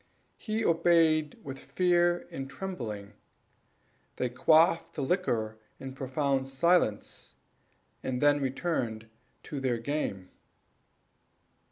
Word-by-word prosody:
He 220 0 -2
obeyed 165 -2 +3
with 135 -1 -7
fear 175 -1 +1
and 135 0 -6
trembling; 110 - -6 1.0
they 125 - -1
quaffed 160 +7 +3
the 145 - -2
liquor 120 - -1 0.2
in 135 0 -7
profound 135 0 -1
silence, 135 - 0 0.7
and 125 -1 -2
then 145 0 +4
returned 130 -5 -2 0.4
to 145 - -5
their 130 -3 0
game. 115 -8 -3
140 Hz, 95 wpm, -29 LUFS, 125-170 Hz, 1.0 s, then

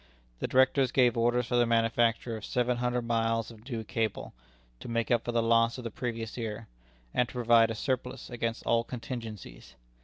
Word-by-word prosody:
The - - -2
Directors 130 0 +3
gave 125 -3 +4
orders 120 +1 +2
for 120 0 0
the 120 -1 +4
manufacture 115 0 +1
of 110 - -8
seven 125 +1 0
hundred 125 0 -1
miles 115 0 0
of 115 +3 -14
new 115 -3 -3
cable, 110 0 -3 0.5
to - - -9
make 115 0 -1
up 120 - +3
for 120 - -1
the 115 -1 +1
loss 115 +1 +3
of 125 - -7
the 115 - -5
previous 115 -1 -4
year, 115 -1 -5 0.5
and 125 -2 +1
to - - -12
provide 115 -2 +4
a 115 - -3
surplus 130 +1 -3
against 115 -2 -3
all 115 0 +2
contingencies. 115 - -8
115 Hz, 190 wpm, -29 LUFS, 115-125 Hz, 0.5 s, gave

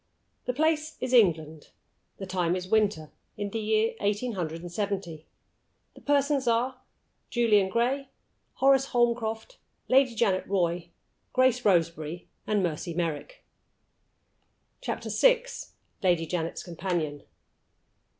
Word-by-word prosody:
THE 250 - -1
place 310 +2 0
is 255 0 -3
England. 160 -9 +2 0.5
The 195 - -6
time 180 -2 0
is 185 0 -4
winter, 200 -7 +1 0.3
in 205 -1 -3
the 225 - -2
year 220 +1 +1
eighteen 205 +4 0
hundred 165 -5 -4
and 175 - -7
seventy. 185 -5 -4 0.7
The - - -16
persons 280 -2 +1
are, 250 +2 +1 0.5
Julian 215 -5 +3
Gray, 255 +6 0 0.4
Horace 270 0 +4
Holmcroft, 235 - 0 0.3
Lady 260 -2 +4
Janet 200 -5 +1
Roy, 175 -3 0 0.4
Grace 255 -1 +3
Roseberry, 165 -3 0 0.2
and 210 -2 +1
Mercy 170 0 -3
Merrick. 170 - -4 1.4
CHAPTER - - -4
VI. - - +4 0.6
LADY 175 -3 +2
JANET'S 165 0 -3
COMPANION. 170 -4 -3
205 Hz, 115 wpm, -28 LUFS, 175-250 Hz, 1.4 s, Horace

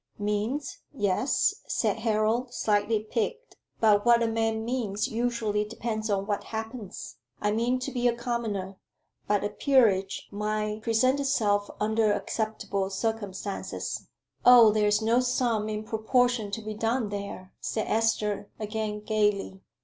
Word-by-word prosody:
"Means? 210 +7 -2
Yes," 205 0 +1
said - - 0
Harold, 230 +3 0
slightly 210 +1 +1
piqued, 355 - -3 0.2
"but 210 -2 +4
what 235 -1 +5
a - - +2
man 225 0 0
means 225 -5 -1
usually 230 -3 0
depends 220 0 -4
on 200 -1 0
what 205 -1 -2
happens. 220 -2 -6 0.2
I 210 - +1
mean 235 +4 +1
to 275 - -3
be 245 -2 +1
a 235 - +2
commoner; 220 -6 -3 0.5
but 205 -1 +2
a 205 - 0
peerage 210 -6 +2
might 210 +1 -2
present 250 +5 +2
itself 210 -7 +1
under 215 0 +2
acceptable 205 -3 -2
circumstances." 200 -1 -4 0.4
"Oh, 240 -3 +9
there 210 0 +2
is 210 +1 +2
no 230 +2 +3
sum 240 -4 0
in 215 0 -3
proportion 225 0 +1
to 220 +2 -5
be 215 0 -4
done 225 +1 0
there," 200 -2 -6
said 220 - -2
Esther, 210 -2 0
again 215 0 -3
gaily. 210 -3 0
220 Hz, 140 wpm, -27 LUFS, 205-235 Hz, 0.5 s, Oh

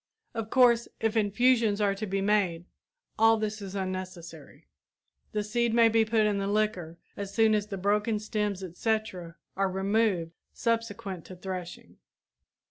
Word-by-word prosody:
Of 225 -2 -4
course, 240 -2 +4
if 225 0 0
infusions 225 0 +3
are 205 -1 +2
to 210 +2 -5
be 195 +1 -1
made 195 -5 +1 0.5
all 225 0 +6
this 215 -1 -3
is 195 -1 -7
unnecessary; 185 -5 -6 0.7
the 210 -1 -1
seed 235 +2 0
may 230 -1 +6
be 225 0 +3
put 220 0 +2
in 205 -1 +1
the 195 - -2
liquor 200 -6 -1 0.2
as 200 -1 -5
soon 220 +1 +3
as 210 -1 0
the 200 -2 -5
broken 210 +3 +1
stems, 210 -2 -2
etc. 185 -2 -3 0.2
are 195 0 +1
removed 190 -2 0 0.2
subsequent 225 -6 -2
to 185 - -10
threshing. 180 -1 -7
205 Hz, 150 wpm, -28 LUFS, 190-220 Hz, 0.7 s, all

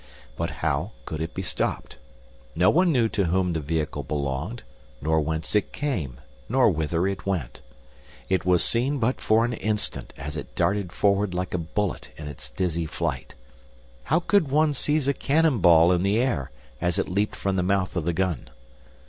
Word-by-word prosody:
But - - -2 0.2
how 75 +10 0
could 80 -1 -4
it 80 0 -4
be - - -3
stopped? - - -3 0.6
No 90 +3 +5
one 180 +1 +4
knew 120 -6 +3
to 100 -3 0
whom 90 +1 +1
the 80 - -1
vehicle 80 0 -2
belonged, 75 - -3 0.4
nor 80 +3 +2
whence 80 0 -3
it 105 - +1
came, 90 - -3 0.3
nor 125 -2 +4
whither 80 +2 0
it 95 0 -3
went. 80 -12 -2 0.7
It 95 -3 +1
was 90 -1 +3
seen 130 +5 +1
but 125 0 0
for 110 +1 +3
an 120 - -2
instant 110 -2 -2
as 75 +2 -6
it 75 - -7
darted 100 -3 0
forward 100 0 +1
like 90 0 -2
a 90 - 0
bullet 95 +3 -2
in 75 - -7
its 75 - -8
dizzy 85 -3 -1
flight. - - -3 0.7
How 160 - +3
could 175 -3 +2
one 150 +2 +3
seize 145 +1 0
a 140 - +3
cannon 150 -2 +2
ball 85 -1 +6
in 90 -1 +2
the 100 +3 +2
air, 120 - 0 0.3
as 90 +1 +1
it 95 - 0
leaped 100 +3 0
from 95 -1 -1
the 95 - +2
mouth 95 0 0
of 85 - 0
the 85 - +1
gun? 90 -1 -1
95 Hz, 185 wpm, -25 LUFS, 80-115 Hz, 0.7 s, ball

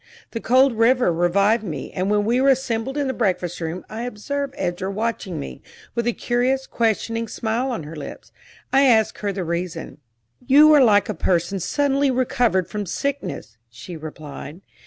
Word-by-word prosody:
The 230 - -4
cold 255 -1 +3
river 245 -5 +4
revived 200 +6 +2
me, 150 -9 -5
and 185 +2 -2
when 205 0 +2
we 240 +4 +2
were 275 - +4
assembled 265 0 0
in 290 - 0
the 260 - -1
breakfast 180 -7 -1
room 165 +2 -4
I 220 +1 -6
observed 270 +4 -4
Edra 175 +2 -2
watching 210 -2 -3
me, 65 -2 -7 0.3
with 235 0 -1
a - - +3
curious, 255 +3 0
questioning 230 0 -1
smile 230 +4 -2
on 235 -10 -3
her 155 +2 -9
lips. 150 - -9 0.4
I 270 - +6
asked 220 -4 +3
her 205 -1 -1
the 190 -1 -3
reason. 170 -2 -4 0.4
"You 295 +4 +7
are 290 -3 +7
like 205 -4 +4
a - - -2
person 175 +3 0
suddenly 280 - +1
recovered 245 -7 +1
from 205 +1 -4
sickness," 280 - -4
she 115 +9 -10
replied. 155 +1 -9
220 Hz, 175 wpm, -22 LUFS, 175-255 Hz, 0.4 s, You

